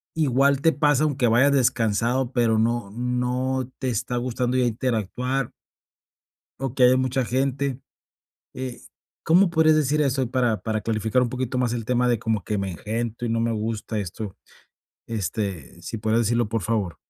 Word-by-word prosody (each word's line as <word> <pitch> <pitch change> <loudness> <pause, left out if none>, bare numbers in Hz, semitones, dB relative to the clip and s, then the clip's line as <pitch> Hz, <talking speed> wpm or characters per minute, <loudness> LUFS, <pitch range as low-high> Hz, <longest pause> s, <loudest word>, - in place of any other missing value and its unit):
igual 140 -2 +3
te 165 - +4
pasa 145 0 +2
aunque 140 -4 +1
vayas 120 +5 +4
descansado, 120 0 +1
pero 115 -3 +2
no 115 -2 0
no 125 +2 -1
te 130 - -1
está 125 +1 -2
gustando 125 +1 -1
ya 130 - +3
interactuar? 125 +2 -1 1.1
O 135 -2 -2
que 130 - +2
haya 125 +1 +6
mucha 130 0 0
gente, 135 +1 -1 0.7
eh, 130 -1 -6 0.4
¿cómo 175 +3 +5
podrías 160 -2 +4
decir 150 0 +2
eso 135 -3 0
para 120 -4 +1
para 110 -1 -2
clarificar 110 +2 0
un 125 - +1
poquito 130 0 -3
más 125 -2 +1
el 115 -2 -3
tema 125 0 +2
de 120 -2 +1
como 110 -4 -1
que: 105 - -2
"Me 100 -1 -2
engento 115 +6 -4
y 115 - -1
no 115 - 0
me 115 0 0
gusta 110 0 -3
esto?". 100 +1 -5 0.7
Este, 100 - -4
si 115 - -5
podrías 110 +2 +1
decirlo, 120 0 +1
por 110 -2 -2
favor. 105 -4 -1
120 Hz, 170 wpm, -24 LUFS, 110-130 Hz, 1.1 s, haya